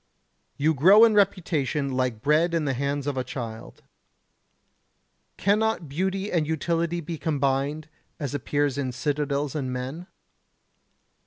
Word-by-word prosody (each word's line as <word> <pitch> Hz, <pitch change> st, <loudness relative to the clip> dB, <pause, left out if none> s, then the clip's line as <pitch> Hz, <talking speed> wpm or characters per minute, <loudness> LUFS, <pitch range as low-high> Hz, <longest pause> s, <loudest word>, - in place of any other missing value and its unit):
You 155 Hz, +3 st, +2 dB
grow 190 Hz, -, +7 dB
in 225 Hz, -, +3 dB
reputation 165 Hz, -8 st, +1 dB
like 125 Hz, -4 st, -1 dB
bread 160 Hz, +4 st, +3 dB
in 160 Hz, -2 st, 0 dB
the 135 Hz, -, 0 dB
hands 140 Hz, +2 st, -2 dB
of 145 Hz, -2 st, -2 dB
a 130 Hz, -, 0 dB
child. 115 Hz, -3 st, -7 dB, 1.5 s
Cannot 210 Hz, -3 st, +1 dB
beauty 190 Hz, +7 st, -2 dB
and 160 Hz, -4 st, +1 dB
utility 170 Hz, +2 st, -1 dB
be 165 Hz, 0 st, -6 dB
combined 145 Hz, 0 st, -1 dB, 0.3 s
as 140 Hz, -3 st, -4 dB
appears 145 Hz, 0 st, -1 dB
in 130 Hz, -3 st, -2 dB
citadels 145 Hz, +1 st, -1 dB
and 135 Hz, -4 st, -3 dB
men? 130 Hz, +8 st, -5 dB
145 Hz, 130 wpm, -25 LUFS, 135-170 Hz, 1.5 s, grow